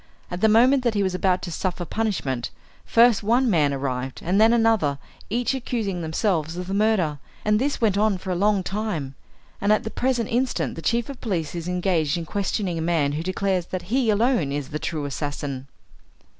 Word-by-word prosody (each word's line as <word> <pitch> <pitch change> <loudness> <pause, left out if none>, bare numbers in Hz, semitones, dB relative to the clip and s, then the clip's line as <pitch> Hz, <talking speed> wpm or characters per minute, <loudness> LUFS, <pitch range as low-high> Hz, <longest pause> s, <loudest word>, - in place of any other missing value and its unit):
At 175 +1 -4
the 220 - +5
moment 250 +5 +5
that 235 -3 +1
he 200 - +2
was 190 -1 0
about 185 0 +1
to 175 - -4
suffer 180 0 -3
punishment, 160 - -2 0.4
first 235 -2 +5
one 240 +5 +2
man 150 -5 +3
arrived, 130 -1 -3
and 190 +5 +2
then 225 +1 +6
another, 225 -12 +2 0.3
each 240 +5 0
accusing 225 -8 -2
themselves 160 0 -1
of 180 - -4
the 190 - -4
murder, 200 -8 +1 0.3
and 210 0 +3
this 280 +3 -1
went 205 -3 +2
on 210 -2 +2
for 185 +1 -5
a - - 0
long 200 +1 +2
time, 190 -9 -3 0.5
and 200 +1 +2
at 215 - +3
the 220 - -5
present 245 -3 0
instant 250 +2 0
the 165 - -7
chief 235 +5 0
of 275 -3 -9
police 175 -9 -2
is 170 -1 -5
engaged 180 -3 0
in 170 - -4
questioning 190 -1 -2
a - - -2
man 160 -4 +1
who 150 +2 -2
declares 185 0 -1
that 185 +3 -5
he 260 -4 +2
alone 215 - +2
is 140 -1 -3
the 150 - -4
true 155 -2 -3
assassin." 140 -1 -4
190 Hz, 200 wpm, -24 LUFS, 160-220 Hz, 0.5 s, then